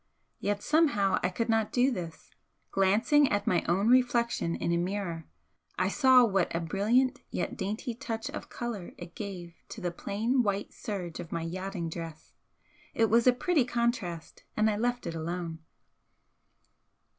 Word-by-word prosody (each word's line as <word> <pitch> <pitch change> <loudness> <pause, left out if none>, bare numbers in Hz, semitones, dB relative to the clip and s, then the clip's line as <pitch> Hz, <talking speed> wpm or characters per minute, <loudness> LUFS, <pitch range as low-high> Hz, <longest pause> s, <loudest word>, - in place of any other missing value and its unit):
Yet 205 0 -1
somehow 285 -12 +3
I - - +1
could 225 +5 -2
not 225 -2 +1
do 255 +2 +3
this. 175 -8 -6 0.4
Glancing 220 +10 +3
at 205 0 0
my 180 - +2
own 190 +5 +2
reflection 235 -7 +2
in - - -1
a 170 - +2
mirror, 175 -2 -3 0.5
I - - +1
saw 260 -3 +6
what 195 -6 0
a - - +1
brilliant 230 +10 +1
yet - - -3
dainty 215 +4 -3
touch 225 -2 -4
of - - -7
colour 230 -7 -5
it 175 -1 -9
gave 185 -5 -7 0.2
to 225 - -8
the 180 -3 -2
plain 220 +8 0
white 200 -2 -2
serge 180 -6 -5
of 170 -2 -7
my 165 -1 -2
yachting 185 +1 -4
dress, 165 -1 -8 0.6
it 225 -2 +2
was 235 +2 +4
a - - +9
pretty 290 +4 +2
contrast, 235 -9 -2
and 215 0 +3
I - - -1
left 245 +3 -1
it - - -3
alone. 165 0 -4
205 Hz, 160 wpm, -29 LUFS, 175-235 Hz, 0.6 s, a